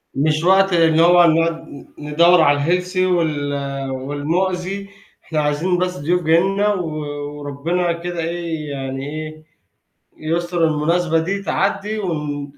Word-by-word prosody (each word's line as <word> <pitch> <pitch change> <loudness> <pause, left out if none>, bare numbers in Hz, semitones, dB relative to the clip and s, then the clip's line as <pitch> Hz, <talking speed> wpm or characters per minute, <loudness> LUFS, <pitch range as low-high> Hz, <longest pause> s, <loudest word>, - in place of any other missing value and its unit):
مش 155 +3 +1
وقت 190 +1 +4
اللي 165 -1 +4
هو 175 0 +6
نُقعُد 165 +1 +1
ن 140 - -11 0.2
ندوّر 170 +3 +5
على 145 -1 +3
الhealthy 180 +4 -1
وال 145 -6 -1
والمؤذي، 180 +8 -2 0.3
إحنا 155 -2 -2
عايزين 155 +5 0
بس 180 0 -1
ضيوف 175 +5 0
جايين 170 +5 +3
لنا 205 +1 +1
و 180 -4 -3 0.5
وربنا 165 +5 -1
كده 175 0 -5
إيه 165 -2 -4
يعني 135 0 -5
إيه، 155 0 -7 0.8
يُستُر 170 +2 -1
المناسبة 165 +2 +1
دي 195 +5 -2
تعدّي 205 +2 -1
وكلّ 150 -6 -3
165 Hz, 135 wpm, -19 LUFS, 150-180 Hz, 0.8 s, هو